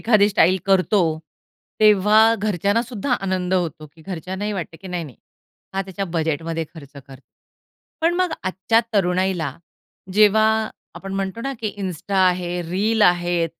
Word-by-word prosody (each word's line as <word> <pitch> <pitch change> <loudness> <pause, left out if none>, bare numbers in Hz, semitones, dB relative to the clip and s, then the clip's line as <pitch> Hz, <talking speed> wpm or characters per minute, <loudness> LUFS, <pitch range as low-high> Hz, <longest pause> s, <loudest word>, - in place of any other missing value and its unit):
एखादी 215 -3 +4
स्टाईल 190 -3 +3
करतो, 195 +1 +3 0.8
तेव्हा 210 0 +5 0.2
घरच्यांना 205 +2 0
सुद्धा 250 +2 -3
आनंद 185 -1 -1
होतो, 165 -4 -2
की 160 +2 -20
घरच्यांनाही 190 +4 -4
वाटतं, 175 -4 -5
की 190 - -9
नाही, 175 -2 -3
नाही. 135 -6 -12 0.6
हा 195 - 0
त्याच्या 195 +1 -5
बजेटमध्ये 160 +1 -1
खर्च 145 -3 -12
करतो. 135 -1 -14 0.7
पण 335 +2 +2
मग 365 0 0
आजच्या 190 +5 +1
तरुणाईला 180 -6 0 0.6
जेव्हा 215 +1 +5 0.5
आपण 195 0 -7
म्हणतो 195 +3 -3
ना, 275 +3 -3
की 215 -2 -3
Insta 185 +2 -4
आहे, 180 -1 -2
रील 210 +6 0
आहे, 175 -2 +3
190 Hz, 140 wpm, -21 LUFS, 175-210 Hz, 0.8 s, तेव्हा